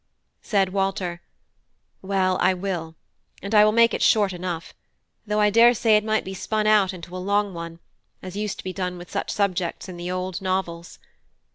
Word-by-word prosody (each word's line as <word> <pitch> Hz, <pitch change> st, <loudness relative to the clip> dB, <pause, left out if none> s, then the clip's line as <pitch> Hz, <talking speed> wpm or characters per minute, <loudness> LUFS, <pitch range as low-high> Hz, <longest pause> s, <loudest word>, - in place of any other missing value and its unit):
Said 195 Hz, -3 st, +1 dB
Walter: 190 Hz, -2 st, -2 dB, 0.8 s
"Well, 190 Hz, -1 st, 0 dB
I 185 Hz, 0 st, +3 dB
will; 175 Hz, -4 st, -4 dB, 0.5 s
and 200 Hz, +2 st, -5 dB
I 210 Hz, -1 st, +7 dB
will 215 Hz, -, +4 dB
make 230 Hz, +1 st, +4 dB
it -, -, -2 dB
short 205 Hz, -4 st, +3 dB
enough, 175 Hz, -2 st, -5 dB, 0.5 s
though 210 Hz, 0 st, 0 dB
I 210 Hz, 0 st, +4 dB
daresay 230 Hz, 0 st, +5 dB
it 210 Hz, -, +3 dB
might 220 Hz, 0 st, 0 dB
be 190 Hz, -, -5 dB
spun 215 Hz, +3 st, -2 dB
out 210 Hz, -3 st, +4 dB
into 180 Hz, -1 st, -9 dB
a -, -, -4 dB
long 200 Hz, +1 st, 0 dB
one, 170 Hz, -1 st, -7 dB, 0.4 s
as 185 Hz, 0 st, -9 dB
used 210 Hz, -1 st, -3 dB
to -, -, -9 dB
be 185 Hz, -, -5 dB
done 180 Hz, -2 st, -3 dB
with 175 Hz, 0 st, -11 dB
such -, -, -3 dB
subjects 185 Hz, -4 st, -1 dB
in 180 Hz, -2 st, -8 dB
the 175 Hz, +1 st, -5 dB
old 185 Hz, 0 st, -3 dB
novels. 185 Hz, -3 st, -3 dB
190 Hz, 185 wpm, -24 LUFS, 180-210 Hz, 0.8 s, I